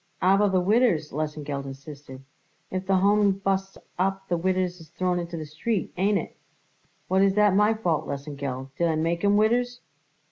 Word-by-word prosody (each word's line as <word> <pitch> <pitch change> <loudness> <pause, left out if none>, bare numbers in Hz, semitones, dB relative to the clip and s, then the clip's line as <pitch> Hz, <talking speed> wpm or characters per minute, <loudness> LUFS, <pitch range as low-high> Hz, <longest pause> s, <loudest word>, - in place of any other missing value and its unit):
"Aber 195 +2 +4
the 190 -1 +2
widders?" 190 -5 +2
Lesengeld 150 -2 -3
insisted. 135 -1 -10 0.5
"If 185 0 -3
the 195 - +3
Home 200 +1 +4
busts 195 0 -2 0.2
up 195 +1 -1
the 175 - +2
widders 180 0 -1
is 160 - -14
thrown 180 +1 -1
into 170 -1 -5
the 155 - -5
street. 175 +8 -3
Ain't 200 +3 +2
it?" - - -5 0.7
"What 190 +1 +2
is 195 0 +3
that 210 -2 +4
my 210 +3 +4
fault, 165 -8 -1
Lesengeld? 140 -2 -5
Did 170 - +3
I 160 - +1
make 165 +3 -1
'em 205 0 +4
widders?" 245 +3 +1
185 Hz, 175 wpm, -25 LUFS, 155-195 Hz, 0.7 s, Aber